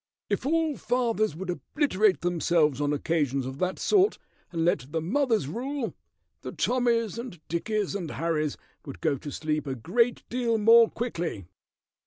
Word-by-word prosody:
"If - - -1
all 320 -1 +1
fathers 230 -7 0
would 180 +2 -4
obliterate 210 - +1
themselves 165 -5 +2
on 145 0 +1
occasions 145 -3 0
of 130 +2 -6
that 185 0 -1
sort, 405 0 +3 0.3
and 165 -2 -1
let 140 -5 0
the 165 - 0
mothers 225 - +1
rule, 255 - -3 0.5
the - - -6
Tommys 235 -3 +1
and 235 -8 -7
Dickies 205 +5 -1
and 180 -5 -4
Harrys 155 -2 -1 0.3
would 140 - -9
go 155 -3 +1
to 145 - -7
sleep 155 0 -2
a 135 - -2
great 230 - 0
deal 235 -2 0
more 230 +2 +7
quickly." 170 - -4
185 Hz, 155 wpm, -27 LUFS, 155-235 Hz, 0.5 s, more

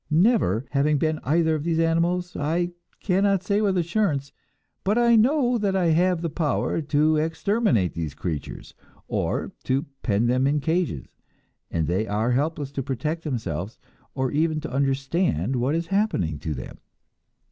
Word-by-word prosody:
Never 160 - +3
having 145 +2 +2
been 155 +1 0
either 160 +3 +2
of 155 -2 -2
these 165 0 0
animals, 170 +2 +1
I 170 +4 0 0.3
cannot 195 0 +2
say 205 +2 +1
with 195 -3 +1
assurance; 170 -6 0 0.5
but 205 +4 +1
I 235 -1 +5
know 245 +1 +3
that 200 -2 0
I 180 -3 +2
have 175 +1 +2
the 165 - 0
power 160 +1 0
to 155 +1 +2
exterminate 160 - +1
these 80 -4 -4
creatures, 80 -4 -5 0.3
or - - -2
to 135 +2 0 0.2
pen 105 0 +1
them 130 +2 +2
in 145 +1 +2
cages, 160 - -1 0.6
and 80 -2 -1
they 95 +7 0
are 110 +4 0
helpless 145 +2 -1
to 140 - -3
protect 145 +5 -3
themselves, 110 - -4 0.4
or 130 -1 -1
even 155 +1 +1
to 155 - -6
understand 135 - 0
what 130 +5 +1
is 165 +1 -1
happening 165 - 0
to 75 0 -3
them. 65 - -8
155 Hz, 160 wpm, -24 LUFS, 130-180 Hz, 0.6 s, I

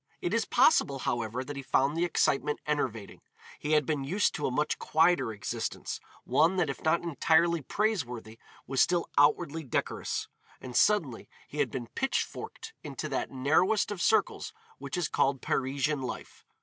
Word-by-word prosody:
It 175 - -2
is 230 -1 +1
possible, 140 - +4
however, 120 -1 -2
that 145 +2 -7
he 140 - -5
found 135 +2 +1
the 170 +1 +1
excitement 150 -3 +1
enervating. 125 -9 -2 0.4
He 150 +1 -1
had 150 -2 +4
been 150 -2 -1
used 190 +10 +1
to 150 - -2
a - - -2
much 150 +4 0
quieter 160 -6 +2
existence, 105 -1 -4 0.2
one 160 +8 +3
that 170 -6 +1
if - - -9
not 165 +2 +2
entirely 170 +1 +2
praiseworthy 125 - -2 0.3
was 135 0 +1
still 175 -1 +2
outwardly 150 +2 +3
decorous, 130 - -2 0.3
and 125 -2 -9
suddenly 155 - +2 0.2
he 150 - -7
had - - +2
been 125 -3 -5
pitch 265 - -1
forked 445 - -9
into 150 +1 -5
that 135 - -2
narrowest 160 +11 +2
of 195 -4 -4
circles 220 - +1 0.3
which - - -5
is 175 -3 0
called 135 0 +1
Parisian 135 +3 -1
life. 125 -1 -7
150 Hz, 165 wpm, -29 LUFS, 130-170 Hz, 0.4 s, possible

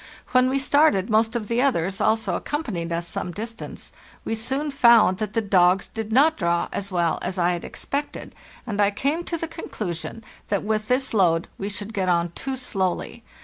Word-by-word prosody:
When 255 0 +4
we 270 - +1
started, 275 -8 +3
most 225 +2 +2
of 220 -3 -2
the 235 +2 +1
others 195 -9 +1
also 220 +1 +1
accompanied 210 - -3
us 170 0 -2
some 180 - -4
distance. 225 +4 -7 0.3
We - - -1
soon 265 +7 -1
found 235 -8 +5
that 215 -1 -3
the 225 - 0
degs 185 -1 +3
did 220 -1 -6
not 295 +7 +4
draw 170 -2 0
as 200 0 -4
well 170 -3 +1
as 190 - -3
I 175 0 +2
had 175 -1 -3
expected, 285 +1 -5 0.3
and 210 -4 -1
I 200 - +4
came 280 +11 -1
to 335 - -2
the 330 - -4
conclusion 220 - -6 0.2
that 200 -2 -1
with 215 0 -1
this 260 0 +1
load 170 -5 +2
we 200 - -3
should 205 +2 -6
get 190 -3 0
on 170 -1 +1
too 265 +9 -4
slowly. 225 -2 -2
215 Hz, 190 wpm, -24 LUFS, 185-255 Hz, 0.3 s, found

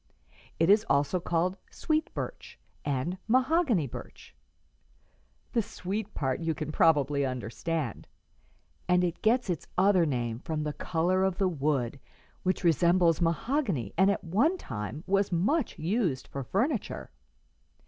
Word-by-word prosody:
It 165 - +4
is 210 +1 +5
also 140 +6 +2
called 175 +2 0
sweet 310 0 -1
birch - - -6 0.3
and 145 +6 -2
mahogany 255 - +3
birch; 125 - -10 1.2
the 235 - +2
sweet 200 +1 -5
part 130 -3 -1
you 165 -1 -1
can 155 -2 -4
probably 145 -3 +3
understand, 130 +2 -3 0.8
and 180 0 +4
it 175 -1 -2
gets 235 +2 +2
its 175 -4 -3
other 185 -3 +4
name 120 -4 -2
from 155 +2 -3
the 150 -1 -2
color 180 +5 0
of 190 -1 0
the 195 - +2
wood, 140 -6 -1 0.4
which 185 0 0
often 180 - +2
resembles 170 +1 +3
mahogany 190 - 0
and 190 +3 +4
at 200 - 0
one 230 - +2
time 120 - -6
was 195 0 +1
much 220 - +1
used 170 - -1
for 140 - -5
furniture. 225 - -2
175 Hz, 140 wpm, -29 LUFS, 145-200 Hz, 1.2 s, is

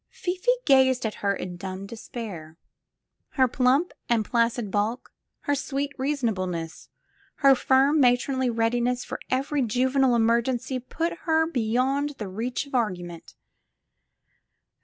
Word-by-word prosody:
Fifi 365 +6 -3 0.2
gazed 260 -3 +4
at 215 - -1
her 200 -1 +1
in 180 -2 -6
dumb 190 +1 -6
despair. 200 -7 -8 0.8
Her 260 -2 +4
plump 260 +7 +2 0.2
and 230 -3 +2
placid 230 -3 0
bulk, 215 +5 -2 0.3
her 285 - 0
sweet 280 0 -2
reasonableness, 195 - -3 0.5
her 275 -1 +6
firm, 270 +3 +3
matronly 255 0 +2
readiness 240 +2 0
for - - -6
every 275 +2 0
juvenile 255 +2 +2
emergency 235 +3 +1
put 325 +7 -3 0.2
her 320 0 +4
beyond 270 +1 0
the 210 - -5
reach 230 +9 -3
of 280 - -16
argument. 180 -8 -3
245 Hz, 120 wpm, -25 LUFS, 220-270 Hz, 0.8 s, her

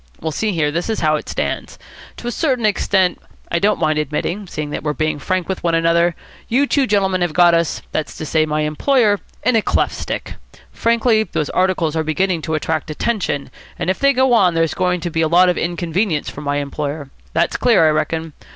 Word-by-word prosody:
Well, 160 - -3
see 215 +8 -1
here. 155 -5 0
This 170 +7 -2
is 220 - -1
how 155 -1 +3
it 150 - -5
stands. - - -3 0.4
To - - -10
a - - -1
certain 255 -4 0
extant, 190 -3 +1 0.3
I 170 - +1
don't 210 +3 +2
mind 155 -2 +1
admitting, 160 +7 -3
seeing 150 -3 -5
that - - -3
we're 150 -1 -1
being 155 +1 -1
frank 185 +4 -1
with 190 - -4
one 170 -1 +2
another, 165 +1 +2 0.3
you 265 +5 +2
two 280 -2 +1
gentlemen 190 -3 +1
have 175 -3 0
got 175 0 +5
us 170 -1 0
that's 155 - -3
to 155 - -5
say, 155 +1 +1
my 155 0 0
employer 205 - +2 0.2
in 250 - +2
a 225 - +4
cleft - - 0
stick. - - -5 0.3
Frankly, 230 -1 +2
those 155 -8 -2
articles 185 -4 +1
are 160 - 0
beginning 170 +2 0
to 160 0 -2
attract 155 0 -2
attention, 155 - -2 0.3
and 185 - 0
if 185 - -4
they 275 0 +4
go 260 -1 +3
on 185 -7 +4
there's 165 -1 +1
going 180 -1 0
to 175 - -3
be 165 0 0
a 160 - +3
lot 180 +3 +5
of 180 - 0
inconvenience 170 0 -1
for 140 - -9
my 145 -1 -1
employer. 145 0 -4 0.2
That's 170 +1 +1
clear, 230 -9 +4
I - - +4
reckon. 160 +1 -2
170 Hz, 215 wpm, -19 LUFS, 155-200 Hz, 0.4 s, got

